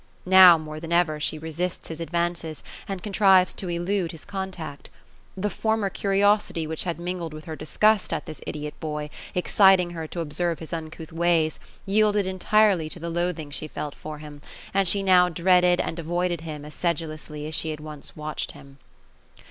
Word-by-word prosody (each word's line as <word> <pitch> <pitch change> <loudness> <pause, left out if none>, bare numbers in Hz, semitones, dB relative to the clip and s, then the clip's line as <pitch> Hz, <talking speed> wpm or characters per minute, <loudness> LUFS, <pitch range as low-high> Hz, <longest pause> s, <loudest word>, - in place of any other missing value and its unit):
Now, 185 -2 +9
more 155 -1 -7
than 165 +1 -7
ever, 170 -3 +2
she 150 +1 -1
resists 160 +3 -4
his 160 - -6
advances, 170 -2 -2 0.2
and 195 -2 -5
contrives 195 -3 +4
to 185 - -6
elude 175 +1 -1
his 165 - -9
con 190 -1 -4
tact. 160 -6 -8 0.5
The 195 +2 0
former 220 -3 0
curiosity 200 -4 +2
which 160 +2 -3
had 170 -2 -2
mingled 175 -2 -4
with 155 - -10
her 160 - -5
disgust 210 +7 +2
at 160 -2 -2
this 155 - -9
idiot 150 0 -4
boy, 150 -1 -4 0.2
exciting 180 -1 +4
her 165 -2 -5
to 170 - -4
observe 165 +2 -1
his 160 - -8
uncouth 160 -1 -6
ways, 165 -2 +2 0.3
yielded 210 0 +3
entirely 190 -2 +2
to 175 - -8
the 170 0 -4
loathing 170 -3 -2
she 155 - -5
felt 150 -1 -5
for 155 -1 -8
him; 150 -1 -11 0.3
and 195 -1 +2
she 195 +3 +1
now 180 -2 +5
dreaded 180 +1 +4
and 165 - -2
avoided 175 +1 -1
him 150 -3 -7
as 150 - -10
sedulously 155 -3 -3
as 155 - -6
she 160 - +1
had 155 -1 -4
once 150 -1 -9
watched 155 0 -4
him. 135 0 -15
170 Hz, 180 wpm, -25 LUFS, 155-185 Hz, 0.5 s, Now